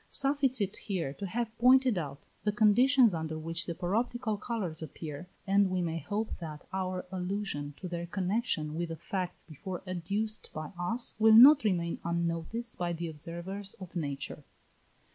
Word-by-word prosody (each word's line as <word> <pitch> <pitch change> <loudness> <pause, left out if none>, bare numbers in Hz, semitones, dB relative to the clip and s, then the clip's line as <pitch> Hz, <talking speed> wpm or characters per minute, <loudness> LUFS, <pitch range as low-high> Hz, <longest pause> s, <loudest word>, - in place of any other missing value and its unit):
Suffice 275 -2 +2
it 200 0 -1
here 175 -9 -3
to 200 +6 -5
have 230 +3 -3
pointed 255 -1 +6
out 145 -5 -4 0.2
the 210 - +2
conditions 235 +3 +5
under 160 -1 -3
which 165 +1 -3
the 170 - -3
paroptical 220 +5 -1
colours 190 -10 -3
appear, 155 +1 -7 0.2
and 200 0 +4
we 185 0 0
may 165 -2 -1
hope 210 +5 -3
that 155 -3 -7
our 185 -1 -2
allusion 180 -6 -3
to 185 - -6
their 170 -1 -4
connexion 185 -4 -1
with 170 +1 -2
the 165 - -4
facts 180 +2 -4
before 175 +3 -7
adduced 200 +5 -2
by 155 -1 -5
us 225 +8 -1
will 220 0 +7
not 275 +5 +10
remain 175 -5 0
unnoticed 170 +7 -2
by 175 -1 0
the 170 0 -4
observers 170 +6 -5
of 185 -2 -11
nature. 140 -5 -4
185 Hz, 160 wpm, -31 LUFS, 165-220 Hz, 0.2 s, not